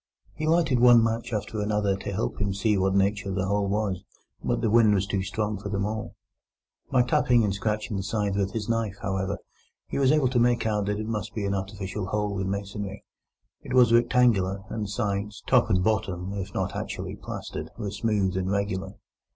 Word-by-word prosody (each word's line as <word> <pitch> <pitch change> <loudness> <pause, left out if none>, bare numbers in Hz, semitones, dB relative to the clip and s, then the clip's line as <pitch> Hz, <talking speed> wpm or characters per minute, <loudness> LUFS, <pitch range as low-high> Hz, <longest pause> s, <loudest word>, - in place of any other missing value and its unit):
He 155 - -3
lighted 160 -6 +3
one 120 -1 +7
match 115 +1 -1
after 105 0 -2
another 105 -1 +1
to 100 +1 -5
help 100 +1 -2
him 100 -1 0
to - - -6
see 105 +2 +2
of 100 - +1
what 95 0 +2
nature 100 +1 +1
the 95 0 -1
hole 100 0 0
was, 100 -3 -1 0.4
but - - 0
the 115 - +1
wind 110 -2 +5
was 95 0 +1
too 100 0 -1
strong 105 +1 -2
for 100 0 -6
them 100 -1 -1
all. 110 +1 -4 0.8
By 130 -2 +4
tapping 125 -3 +3
and 100 -2 +1
scratching 105 +1 -2
the - - -1
sides 100 0 -1
with 100 -1 0
his 110 -2 -3
knife, 115 -4 0
however, 95 +1 -1 0.5
he - - -3
was 135 -1 +4
able 150 -4 +3
to 125 -1 +1
make 120 -1 +3
out 105 -2 0
that 105 0 0
it 110 - -3
must 110 -1 -4
be 105 -3 -2
an 100 - 0
artificial 95 0 -4
hole 105 0 -1
in 95 0 -1
masonry. 100 0 -4 0.6
It - - -4
was 125 -2 +6
rectangular, 115 -5 +3
and 110 -2 -2
the - - -6
sides, 105 -1 -2
top, - - +4
and 90 -3 +2
bottom, 95 -3 -1
if 100 -1 -4
not - - -2
actually - - -4
plastered, - - -6
were 105 -4 -4
smooth 100 -2 0
and 95 0 -1
regular. 100 -1 -2
105 Hz, 210 wpm, -26 LUFS, 100-110 Hz, 0.8 s, one